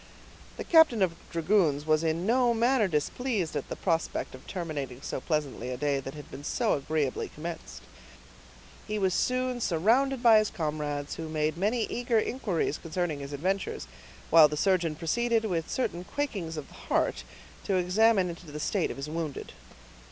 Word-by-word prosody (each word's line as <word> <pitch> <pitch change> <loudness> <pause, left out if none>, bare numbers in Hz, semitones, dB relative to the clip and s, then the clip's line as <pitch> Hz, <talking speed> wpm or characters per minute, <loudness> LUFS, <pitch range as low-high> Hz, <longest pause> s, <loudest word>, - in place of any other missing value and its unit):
The - - -4
captain 320 - +5
of 175 -3 +1 0.2
dragoons 165 -4 +2
was 155 0 +2
in 165 +2 0
no 240 +1 +3
manner 235 -1 +3
displeased 185 - -1
at - - -3
the - - -3
prospect 165 -3 -1
of 130 - -12
terminating 145 -8 -5
so - - -4
pleasantly 145 -6 -2
a 125 - -3
day 140 0 0
that 135 +1 -7
had 150 - -10
been 140 - -8
so - - +1
agreeably 145 -1 -1
commenced. 165 +2 -7 1.0
He 215 0 -2
was 190 -3 +1
soon 255 +4 0
surrounded 240 +10 +2
by 225 -2 +8
his 215 - 0
comrades, 150 -3 -3
who 160 -1 -5
made 155 -1 0
many 215 +6 +1
eager 240 0 0
inquiries 210 - -1
concerning 165 -2 -2
his 140 0 -7
adventures, 185 +7 -2 0.5
while 160 -1 +9
the 150 0 -4
surgeon 175 -3 +2
proceeded, 225 +8 0
with 170 -6 -2
certain 180 -9 -2
quakings 195 - -3
of 150 - -6
the - - -16
heart, - - -1 0.4
to 195 - +1
examine 190 +2 +3
into 170 -1 -8
the 150 +1 -6
state 185 +4 0
of - - -6
his 140 +2 -5
wounded. 155 -2 -5
170 Hz, 170 wpm, -28 LUFS, 150-220 Hz, 1.0 s, while